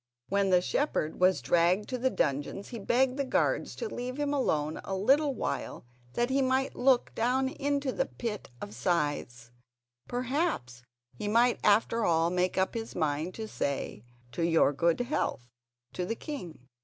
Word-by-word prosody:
When 200 Hz, -1 st, +2 dB
the 180 Hz, -1 st, +4 dB
shepherd 225 Hz, -, -1 dB
was 185 Hz, 0 st, +4 dB
dragged 175 Hz, +4 st, +3 dB
to 255 Hz, -, -2 dB
the 260 Hz, +2 st, +2 dB
dungeons 145 Hz, -, -2 dB
he 235 Hz, -, -6 dB
begged 250 Hz, +5 st, +2 dB
the 280 Hz, -, +1 dB
guards 260 Hz, -, 0 dB
to 465 Hz, -, -4 dB
leave 255 Hz, -, -5 dB
him 290 Hz, -1 st, 0 dB
alone 155 Hz, -, 0 dB
a 195 Hz, -, -3 dB
little 275 Hz, +8 st, +3 dB
while -, -, -4 dB, 0.3 s
that 240 Hz, +2 st, 0 dB
he 275 Hz, +1 st, +3 dB
might 260 Hz, +1 st, +1 dB
look 255 Hz, -1 st, +3 dB
down 255 Hz, +3 st, +1 dB
into 280 Hz, -1 st, -1 dB
the -, -, -1 dB
pit 220 Hz, -4 st, -5 dB
of 105 Hz, -, -6 dB
scythes; 125 Hz, -4 st, -1 dB, 0.6 s
perhaps 245 Hz, -, -2 dB, 0.3 s
he 210 Hz, -, -5 dB
might 235 Hz, +3 st, +3 dB
after 220 Hz, +2 st, +3 dB
all 165 Hz, -1 st, +2 dB
make 180 Hz, 0 st, 0 dB
up 190 Hz, 0 st, +1 dB
his 225 Hz, -1 st, -5 dB
mind 155 Hz, +3 st, -1 dB
to 220 Hz, -1 st, -5 dB
say 140 Hz, -, -3 dB, 0.3 s
"To 170 Hz, -, -4 dB
your 165 Hz, -3 st, +4 dB
good 170 Hz, -, +2 dB
health" 245 Hz, -, -2 dB, 0.5 s
to 180 Hz, -, -2 dB
the 225 Hz, +6 st, -2 dB
king. 175 Hz, -, -8 dB
210 Hz, 170 wpm, -29 LUFS, 170-260 Hz, 0.6 s, the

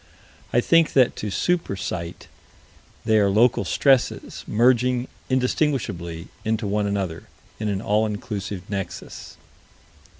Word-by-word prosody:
I 120 Hz, -, +3 dB
think 165 Hz, +4 st, +4 dB
that 130 Hz, -3 st, +4 dB
to 105 Hz, -, -3 dB
super 170 Hz, -, 0 dB
sight 85 Hz, -2 st, -5 dB, 0.8 s
they 110 Hz, -1 st, +4 dB
are 100 Hz, -1 st, +3 dB
local 110 Hz, +5 st, +3 dB
stresses 135 Hz, -3 st, +1 dB
merging 125 Hz, +2 st, +3 dB, 0.2 s
indistinguishably 120 Hz, -, -1 dB
into 110 Hz, 0 st, -1 dB
one 105 Hz, +1 st, 0 dB
another, 95 Hz, -5 st, -3 dB, 0.3 s
in 110 Hz, -1 st, -1 dB
an 100 Hz, 0 st, -2 dB
all 105 Hz, +2 st, +2 dB
inclusive 105 Hz, -3 st, -5 dB
nexus. 95 Hz, -4 st, -6 dB
105 Hz, 120 wpm, -23 LUFS, 100-125 Hz, 0.8 s, think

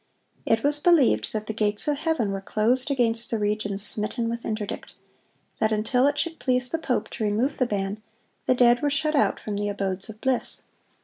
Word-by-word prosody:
It 225 Hz, 0 st, +2 dB
was 295 Hz, +1 st, +3 dB
believed 325 Hz, -5 st, +3 dB
that 215 Hz, -1 st, -4 dB
the 220 Hz, -, -4 dB
gates 210 Hz, +1 st, 0 dB
of 295 Hz, -1 st, +1 dB
heaven 315 Hz, -10 st, -1 dB
were 195 Hz, 0 st, -4 dB
closed 240 Hz, +7 st, +1 dB
against 235 Hz, -4 st, +2 dB
the 230 Hz, -, -1 dB
region 210 Hz, -1 st, -2 dB
smitten 215 Hz, +3 st, +2 dB
with 235 Hz, 0 st, -5 dB
interdict; 215 Hz, -2 st, -5 dB, 0.6 s
that 220 Hz, -, +1 dB
until 245 Hz, +5 st, +1 dB
it 290 Hz, 0 st, 0 dB
should 330 Hz, +1 st, -2 dB
please 250 Hz, -1 st, +2 dB
the 330 Hz, -, -2 dB
pope 245 Hz, -8 st, -2 dB
to -, -, -4 dB
remove 215 Hz, +7 st, -1 dB
the 255 Hz, -, +2 dB
ban, 200 Hz, 0 st, -3 dB, 0.5 s
the 255 Hz, -, +3 dB
dead 245 Hz, -1 st, +4 dB
were 290 Hz, -, +1 dB
shut 305 Hz, +2 st, 0 dB
out 280 Hz, -, +1 dB
from 210 Hz, -, -5 dB
the 205 Hz, 0 st, -2 dB
abodes 195 Hz, 0 st, -2 dB
of 215 Hz, 0 st, -10 dB
bliss. 260 Hz, 0 st, 0 dB
230 Hz, 200 wpm, -24 LUFS, 210-265 Hz, 0.6 s, dead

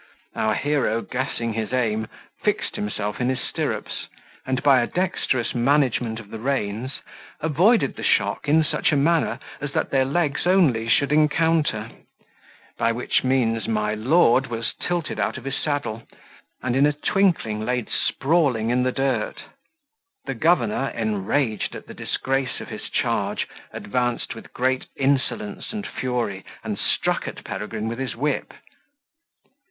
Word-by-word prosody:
Our 110 Hz, -1 st, +1 dB
hero, 140 Hz, -6 st, +1 dB
guessing 125 Hz, -3 st, -2 dB
his 110 Hz, -1 st, -3 dB
aim, 110 Hz, -4 st, 0 dB, 0.4 s
fixed 210 Hz, 0 st, 0 dB
himself 105 Hz, -, -3 dB
in 125 Hz, -, +2 dB
his 130 Hz, -, 0 dB
stirrups, -, -, -3 dB, 0.4 s
and 130 Hz, +1 st, 0 dB
by 135 Hz, -4 st, +6 dB
a 120 Hz, -, 0 dB
dexterous 175 Hz, -9 st, 0 dB
management 125 Hz, -3 st, +2 dB
of 105 Hz, -2 st, -12 dB
the 110 Hz, -, -6 dB
reins 125 Hz, 0 st, -2 dB, 0.4 s
avoided 175 Hz, -, +3 dB
the -, -, -7 dB
shock -, -, +1 dB
in 160 Hz, +2 st, +5 dB
such 150 Hz, -, +1 dB
a -, -, +3 dB
manner 160 Hz, +3 st, +2 dB, 0.2 s
as 145 Hz, -1 st, -5 dB
that -, -, 0 dB
their 135 Hz, -1 st, +3 dB
legs 150 Hz, +3 st, 0 dB
only 140 Hz, -12 st, +3 dB
should 140 Hz, +3 st, +3 dB
encounter; 150 Hz, -6 st, +2 dB, 0.9 s
by 115 Hz, 0 st, +3 dB
which 120 Hz, +2 st, 0 dB
means 125 Hz, -4 st, +1 dB
my 105 Hz, -1 st, 0 dB
lord 130 Hz, +2 st, +4 dB
was 115 Hz, -1 st, -2 dB
tilted 175 Hz, -2 st, -1 dB
out -, -, 0 dB
of -, -, -9 dB
his 135 Hz, -, -2 dB
saddle, 145 Hz, -7 st, -2 dB, 0.6 s
and 125 Hz, -1 st, 0 dB
in 140 Hz, +2 st, +5 dB
a 150 Hz, -, +1 dB
twinkling 150 Hz, -, +1 dB
laid 125 Hz, 0 st, -1 dB
sprawling 135 Hz, -7 st, +2 dB
in 125 Hz, +1 st, +2 dB
the 130 Hz, 0 st, +2 dB
dirt. 135 Hz, +1 st, -1 dB, 0.8 s
The -, -, -2 dB
governor, 135 Hz, -7 st, +2 dB
enraged 110 Hz, +2 st, 0 dB
at -, -, -8 dB
the -, -, -10 dB
disgrace 135 Hz, -1 st, -1 dB
of -, -, -8 dB
his -, -, -7 dB
charge, -, -, 0 dB, 0.2 s
advanced 120 Hz, +1 st, -1 dB
with 115 Hz, -, -12 dB
great 130 Hz, +1 st, 0 dB
insolence 130 Hz, -6 st, -1 dB
and 210 Hz, -1 st, -4 dB
fury, 120 Hz, -7 st, -2 dB, 0.2 s
and -, -, -3 dB
struck -, -, 0 dB
at -, -, -7 dB
Peregrine 110 Hz, +1 st, -4 dB
with 115 Hz, +2 st, -3 dB
his 135 Hz, -2 st, -3 dB
whip. 145 Hz, +4 st, -1 dB
130 Hz, 150 wpm, -24 LUFS, 115-145 Hz, 0.9 s, by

